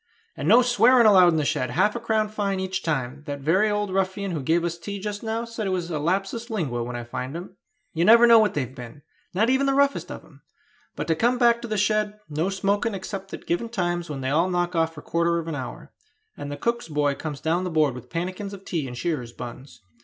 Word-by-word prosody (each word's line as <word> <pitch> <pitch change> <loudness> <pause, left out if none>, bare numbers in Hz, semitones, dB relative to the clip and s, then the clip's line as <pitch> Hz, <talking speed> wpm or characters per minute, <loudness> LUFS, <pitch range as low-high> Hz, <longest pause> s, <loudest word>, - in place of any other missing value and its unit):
" - - -39
and 140 - -4
no 235 +6 +7
swearing 240 0 +5
allowed 190 -4 +7
in 170 - +3
the 155 -2 +1
shed; 145 -4 0
half 190 - +2
a - - -2
crown 220 -2 0
fine 205 -2 -2
each 190 0 -2
time; 140 -3 -2
that 145 -1 -4
very 185 +10 +2
old 205 -2 -1
ruffian 195 +1 -1
who 160 -4 -3
gave 165 +5 +1
us 170 0 -3
tea 200 +4 -6
just 205 +1 -5
now 225 +1 -2
said 230 -3 -4
it - - 0
was 180 -2 -2
a 155 - -1
lapsus 195 +9 -1
lingua 150 - -2
when 120 +1 -5
I 120 - -4
fined 125 +4 -5
him! 180 +2 -9 0.4
You 165 - +1
never 230 +5 +8
know 230 -1 +8
what 215 -1 +2
they've 130 -3 -2
been, 125 +3 -11 0.3
not 220 +6 +3
even 270 +1 +2
the 275 - +2
roughest 280 0 +1
of - - -8
them. - - -20 0.5
But - - -3
to 165 - +2
come 240 +8 +2
back 235 -1 +4
to 240 - -5
the 215 -1 -2
shed: 210 +1 0
no 155 +5 -1
smoking 200 +3 0
except 195 0 -6
at - - -13
given 200 +7 -1
times 175 -5 -2
when 140 -3 -5
they 130 - -2
all 165 +5 +2
knock 175 0 0
off 165 0 +1
for 150 - -10
quarter 170 0 +1
of 165 -1 -4
an 165 - -3
hour, 130 -4 -7 0.4
and 145 0 -7
the 145 - -5
cook's 235 0 -1
boy 145 -2 +1
comes 145 0 -6
down 165 +4 0
the 185 - -2
board 155 -5 +2
with 125 -1 -10
pannikins 185 +4 -4
of 195 -1 -11
tea 155 -6 -2
and 125 -1 -7
shearers' 125 -7 -3
buns. 125 0 -10
180 Hz, 250 wpm, -24 LUFS, 150-210 Hz, 0.5 s, never